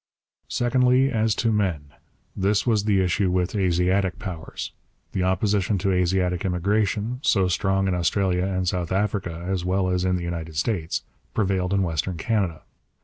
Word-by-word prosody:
Secondly, 125 Hz, +2 st, +3 dB
as 110 Hz, -2 st, +1 dB
to 115 Hz, -, +1 dB
men. 90 Hz, -9 st, -1 dB, 0.4 s
This 100 Hz, +1 st, +1 dB
was 110 Hz, -4 st, +2 dB
the 100 Hz, -3 st, +3 dB
issue 90 Hz, +1 st, +1 dB
with 90 Hz, 0 st, 0 dB
Asiatic 95 Hz, 0 st, +1 dB
powers. 85 Hz, -6 st, -6 dB, 0.4 s
The 95 Hz, -, -1 dB
opposition 100 Hz, +2 st, +1 dB
to 95 Hz, +2 st, 0 dB
Asiatic 90 Hz, -1 st, +1 dB
immigration, 105 Hz, +5 st, 0 dB
so 95 Hz, -9 st, +3 dB
strong 95 Hz, +1 st, +1 dB
in 95 Hz, -, +1 dB
Australia 90 Hz, +1 st, +1 dB
and 95 Hz, -1 st, -1 dB
South 90 Hz, -2 st, -1 dB
Africa 95 Hz, -4 st, -1 dB
as 95 Hz, -2 st, -1 dB
well 95 Hz, +1 st, +1 dB
as 90 Hz, 0 st, 0 dB
in 95 Hz, 0 st, +1 dB
the 90 Hz, -, -3 dB
United 85 Hz, -2 st, -5 dB
States, 85 Hz, -1 st, -1 dB, 0.3 s
prevailed 95 Hz, -3 st, 0 dB
in 100 Hz, -1 st, +2 dB
Western 85 Hz, +1 st, -2 dB
Canada. 95 Hz, -4 st, -1 dB
95 Hz, 155 wpm, -24 LUFS, 90-100 Hz, 0.4 s, Secondly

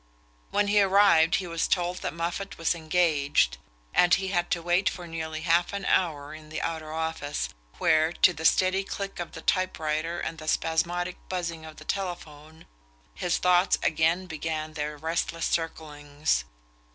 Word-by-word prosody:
When 205 Hz, -, +2 dB
he 205 Hz, 0 st, +4 dB
arrived 195 Hz, -4 st, +5 dB
he 190 Hz, -, -1 dB
was 165 Hz, -1 st, -1 dB
told 180 Hz, 0 st, 0 dB
that -, -, -3 dB
Moffatt 170 Hz, +4 st, -4 dB
was 165 Hz, -, +1 dB
"engaged," 155 Hz, -, +1 dB, 0.3 s
and 175 Hz, 0 st, +4 dB
he 190 Hz, 0 st, -3 dB
had 175 Hz, -2 st, 0 dB
to 170 Hz, -, 0 dB
wait 175 Hz, +2 st, +2 dB
for 180 Hz, -, -8 dB
nearly 160 Hz, -1 st, -5 dB
half 170 Hz, +2 st, +2 dB
an 200 Hz, -2 st, -4 dB
hour 155 Hz, -5 st, +1 dB
in 155 Hz, 0 st, -11 dB
the 155 Hz, -, -4 dB
outer 160 Hz, -2 st, -4 dB
office, 160 Hz, -2 st, -3 dB, 0.3 s
where, 155 Hz, +1 st, +3 dB
to 180 Hz, -, +4 dB
the 160 Hz, 0 st, -8 dB
steady 185 Hz, +3 st, +3 dB
click 195 Hz, -1 st, -5 dB
of 175 Hz, -, -5 dB
the -, -, -8 dB
type 185 Hz, -1 st, +1 dB
writer 155 Hz, +2 st, -2 dB
and 165 Hz, -, -4 dB
the 155 Hz, -, -9 dB
spasmodic 175 Hz, +3 st, 0 dB
buzzing 170 Hz, -3 st, -3 dB
of 155 Hz, -1 st, -10 dB
the 155 Hz, -, -13 dB
telephone, 160 Hz, -5 st, -5 dB, 0.5 s
his 180 Hz, -2 st, 0 dB
thoughts 180 Hz, +1 st, +3 dB
again 165 Hz, +4 st, +2 dB
began 155 Hz, -2 st, -4 dB
their 150 Hz, 0 st, -4 dB
restless 165 Hz, +2 st, -2 dB
circlings. 145 Hz, -, -1 dB
165 Hz, 165 wpm, -27 LUFS, 155-180 Hz, 0.5 s, arrived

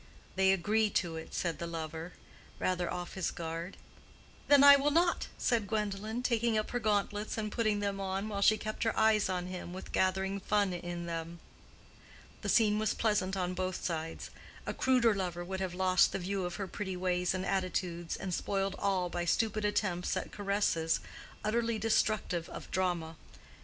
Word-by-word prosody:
"They 190 Hz, 0 st, +4 dB
agree 210 Hz, +4 st, +2 dB
to 170 Hz, -4 st, -1 dB
it," 160 Hz, -, -7 dB
said 170 Hz, -3 st, -1 dB
the 170 Hz, -, -3 dB
lover, 160 Hz, +1 st, -5 dB, 0.4 s
rather 180 Hz, -1 st, 0 dB
off 175 Hz, 0 st, -5 dB
his 190 Hz, -3 st, -1 dB
guard. 165 Hz, +2 st, -5 dB, 0.7 s
"Then 285 Hz, -1 st, +7 dB
I 285 Hz, 0 st, +11 dB
will 280 Hz, +1 st, +2 dB
not!" 340 Hz, +3 st, +2 dB
said 230 Hz, -4 st, +1 dB
Gwendolen, 215 Hz, +2 st, -2 dB
taking 235 Hz, -2 st, +2 dB
up 215 Hz, -, -1 dB
her 245 Hz, -, 0 dB
gauntlets 210 Hz, -1 st, 0 dB
and 215 Hz, -1 st, -2 dB
putting 215 Hz, -3 st, +1 dB
them 200 Hz, -1 st, -1 dB
on, 195 Hz, +1 st, -2 dB
while 200 Hz, -2 st, -3 dB
she 215 Hz, +2 st, +5 dB
kept 215 Hz, 0 st, -5 dB
her 225 Hz, -, 0 dB
eyes 220 Hz, -2 st, +4 dB
on 180 Hz, -1 st, -1 dB
him 180 Hz, -1 st, -6 dB
with 190 Hz, -, -8 dB
gathering 190 Hz, +1 st, +1 dB
fun 200 Hz, -1 st, +1 dB
in 175 Hz, 0 st, -5 dB
them. 165 Hz, 0 st, -5 dB, 1.0 s
The -, -, -3 dB
scene 210 Hz, -2 st, +4 dB
was 215 Hz, -, 0 dB
pleasant 205 Hz, -4 st, +1 dB
on 180 Hz, -1 st, -1 dB
both 185 Hz, 0 st, -3 dB
sides. 165 Hz, -1 st, -4 dB, 0.3 s
A -, -, -2 dB
cruder 250 Hz, -4 st, +3 dB
lover 175 Hz, -3 st, -3 dB
would 190 Hz, +1 st, -4 dB
have 185 Hz, -2 st, -3 dB
lost 185 Hz, -1 st, +4 dB
the -, -, 0 dB
view 190 Hz, 0 st, -2 dB
of 175 Hz, -, -4 dB
her 200 Hz, -, -3 dB
pretty 190 Hz, 0 st, -4 dB
ways 180 Hz, 0 st, 0 dB
and 185 Hz, 0 st, -2 dB
attitudes, 180 Hz, -3 st, -1 dB
and 185 Hz, -, -4 dB
spoiled 195 Hz, +2 st, -1 dB
all 190 Hz, -3 st, +1 dB
by 175 Hz, 0 st, -3 dB
stupid 215 Hz, +4 st, +1 dB
attempts 190 Hz, -4 st, 0 dB
at -, -, -4 dB
caresses, 200 Hz, -5 st, +1 dB, 0.4 s
utterly 230 Hz, +1 st, 0 dB
destructive 215 Hz, -5 st, +1 dB
of -, -, -9 dB
drama. 175 Hz, -4 st, -1 dB
190 Hz, 180 wpm, -32 LUFS, 175-215 Hz, 1.0 s, I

